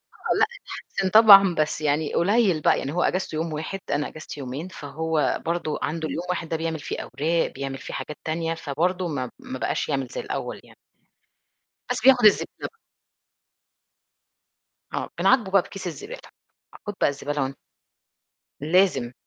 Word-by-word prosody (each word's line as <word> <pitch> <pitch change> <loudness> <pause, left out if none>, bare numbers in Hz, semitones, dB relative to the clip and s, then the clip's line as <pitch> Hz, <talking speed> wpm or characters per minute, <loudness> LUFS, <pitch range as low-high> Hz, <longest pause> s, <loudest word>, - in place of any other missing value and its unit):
آه، - - -1
لأ 440 - +6 0.2
اتحسن 190 -1 -4
طبعًا، 200 -4 +8
بس 155 0 0
يعني 150 +1 0
قليل 195 -3 +3
بقى، - - +3
يعني 140 - -4
هو 175 - +1
أجازته 185 -3 -1
يوم 160 0 -2
واحد، 160 +6 -4
أنا 145 0 0
أجازتي 155 -1 -9
يومين، 135 +6 -5
فهو 155 -3 -2
برضه 165 -2 -1
عنده 160 0 -2
اليوم 170 - -4
واحد 170 -2 -2
ده 165 - -1
بيعمل 160 -1 -3
فيه - - -5
أوراق، 165 +3 0
بيعمل 135 0 -4
فيه - - -8
حاجات 150 - -5
تانية، 165 +1 -1
فبرضه 175 +4 -1
ما 130 -5 -3
ما 260 0 -7
بقاش - - -1
يعمل - - -1
زي - - -5
الأول - - -5
يعني. - - -19 1.2
بس - - -1
بياخد 250 -4 +6
الزبدة 210 - +3
ب 455 - -23 2.1
آه، - - -3
بنعاقبه 225 -8 +3
بقى 195 - +5
بكيس 195 +1 -8
الزبالة، 420 - -7 0.7
"خد 205 - -2
بقى - - +5
الزبالة 145 0 -2
وان" 135 +1 -4 1.2
لازم. 175 -11 +3
165 Hz, 160 wpm, -24 LUFS, 150-190 Hz, 2.1 s, طبعًا